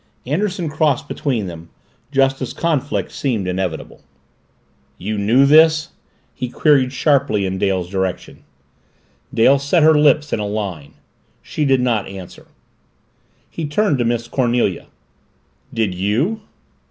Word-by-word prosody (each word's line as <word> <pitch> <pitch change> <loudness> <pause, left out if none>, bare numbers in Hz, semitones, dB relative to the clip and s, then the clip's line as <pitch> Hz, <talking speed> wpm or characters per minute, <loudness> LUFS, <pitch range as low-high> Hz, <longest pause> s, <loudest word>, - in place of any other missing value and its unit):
Anderson 175 +5 -1
crossed 150 -2 0
between 125 -10 -2
them, 85 -2 -9 0.4
just 135 -1 +2
as 130 - -4
conflict 145 -4 -1
seemed 115 -9 -2
inevitable. 90 -3 -4 1.0
"You 105 +7 -4
knew 110 +7 +3
this?" 155 +1 +5 0.4
he 125 - -5
queried 135 -1 +3
sharply 135 -7 +1
in 95 0 -3
Dale's 95 -3 0
direction. 95 -1 -4 0.9
Dale 135 +5 +4
set 145 +4 +2
her 160 +1 +6
lips 150 0 +3
in - - 0
a 105 - -2
line. 95 -9 -5 0.5
She 150 - -2
did 135 -2 +3
not 115 -5 0
answer. 95 -2 -10 1.0
He 160 -2 -5
turned 150 -2 +1
to - - +2
Miss 120 0 -1
Cornelia. 120 -7 0 0.8
"Did 110 -5 -1
you?" 115 - -1
125 Hz, 130 wpm, -19 LUFS, 100-150 Hz, 1.0 s, her